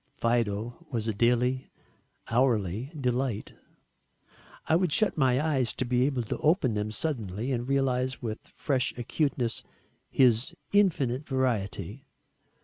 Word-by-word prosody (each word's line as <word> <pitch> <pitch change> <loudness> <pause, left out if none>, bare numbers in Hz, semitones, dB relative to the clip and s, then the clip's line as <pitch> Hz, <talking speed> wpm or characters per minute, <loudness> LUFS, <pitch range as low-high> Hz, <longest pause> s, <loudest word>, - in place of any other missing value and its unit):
Fido 115 +3 -1
was 115 -4 -2
a 110 - 0
daily, 125 +4 +1 0.6
hourly 115 - +1
delight. 125 -3 -1 1.1
I 160 - +3
would 180 -1 +2
shut 215 +5 +3
my 130 -4 +3
eyes, 140 -6 +1
to 130 - -1
be 125 +1 +2
able 130 -4 -1
to 110 - -3
open 155 - +3
them 105 0 -1
suddenly 110 - -3
and 120 -1 -2
realise 130 -1 +1
with 110 -2 -4
fresh 130 -4 -1
acuteness 125 -1 -1 0.5
his 125 +5 +3 0.2
infinite 150 -10 +2
variety. 115 - -2
125 Hz, 125 wpm, -28 LUFS, 115-135 Hz, 1.1 s, I